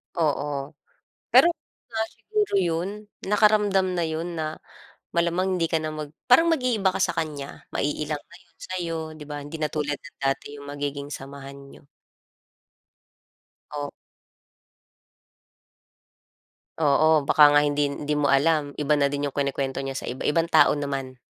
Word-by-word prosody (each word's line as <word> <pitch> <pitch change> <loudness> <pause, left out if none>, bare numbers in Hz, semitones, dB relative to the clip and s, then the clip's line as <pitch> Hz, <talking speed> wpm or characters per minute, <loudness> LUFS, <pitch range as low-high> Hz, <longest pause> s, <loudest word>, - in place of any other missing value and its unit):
Oo. 145 -3 -1 0.6
Pero - - +8
kung - - -69
wala 220 -1 -1
siguro 425 -1 -2
yun, 170 +1 0 0.3
nakaramdam 210 -2 +3
na 170 - 0
yun 165 +2 -3
na 155 -1 -4 0.5
malamang 175 +2 +1
hindi 165 - +2
ka 165 - +1
na 155 - -2
mag 155 -1 -6 0.2
parang 295 +7 +6
mag-iiba 250 -11 +2
ka - - -1
sa - - +1
kanya, 150 -4 -5
ma-iilang 150 +1 -1
na 170 - -15
yun 170 -3 -28
sa'yo, 175 -3 -4 0.2
di 150 - -8
ba? 145 -1 -6
Hindi 155 +2 -7
na 155 - +1
tulad 145 -1 -2
ng 145 - -14
dati 135 +1 -1
yung 140 0 -10
magiging 145 0 -4
samahan 140 0 -8
niyo. - - -15 1.9
Op 145 -1 -4 2.9
Oo, 155 0 +4
baka 150 +1 +7
nga 145 0 +5
hindi, 145 0 +1
hindi 145 +1 -3
mo 145 -2 +1
alam, 145 +1 +3
iba 150 0 +1
na 140 -1 +3
din 145 0 -2
yung 140 - -4
kinukuwento 140 -1 -1
niya 135 0 -4
sa - - -5
iba, 125 - -5
ibang 165 +2 +2
tao 160 -2 +5
naman. 135 -2 -4
150 Hz, 150 wpm, -25 LUFS, 145-170 Hz, 2.9 s, Pero